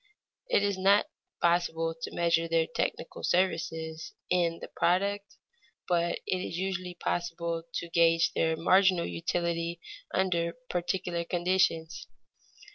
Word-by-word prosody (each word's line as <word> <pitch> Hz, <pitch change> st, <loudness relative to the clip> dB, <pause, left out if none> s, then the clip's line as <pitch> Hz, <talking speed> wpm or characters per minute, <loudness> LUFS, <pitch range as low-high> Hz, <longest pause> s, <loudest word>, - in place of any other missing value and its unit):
It 205 Hz, -, +3 dB
is 200 Hz, -2 st, 0 dB
not 200 Hz, +2 st, +5 dB, 0.4 s
possible 165 Hz, -1 st, +2 dB
to 165 Hz, 0 st, -7 dB
measure 165 Hz, -1 st, +2 dB
their 165 Hz, 0 st, +2 dB
technical -, -, -3 dB
services 160 Hz, -3 st, -1 dB, 0.2 s
in 170 Hz, -2 st, +2 dB
the -, -, -7 dB
product, 200 Hz, +3 st, 0 dB, 0.5 s
but 170 Hz, -1 st, +1 dB
it 180 Hz, -2 st, -2 dB
usually 185 Hz, 0 st, -3 dB
is -, -, -33 dB
possible 170 Hz, -1 st, -2 dB
to 170 Hz, -, -4 dB
gage 165 Hz, 0 st, +3 dB
their 160 Hz, 0 st, +1 dB
marginal 185 Hz, +1 st, +4 dB
utility 170 Hz, -, -2 dB, 0.3 s
under 170 Hz, -3 st, +1 dB, 0.2 s
particular 175 Hz, -1 st, -1 dB
conditions. 175 Hz, -1 st, 0 dB
170 Hz, 120 wpm, -29 LUFS, 165-185 Hz, 0.5 s, not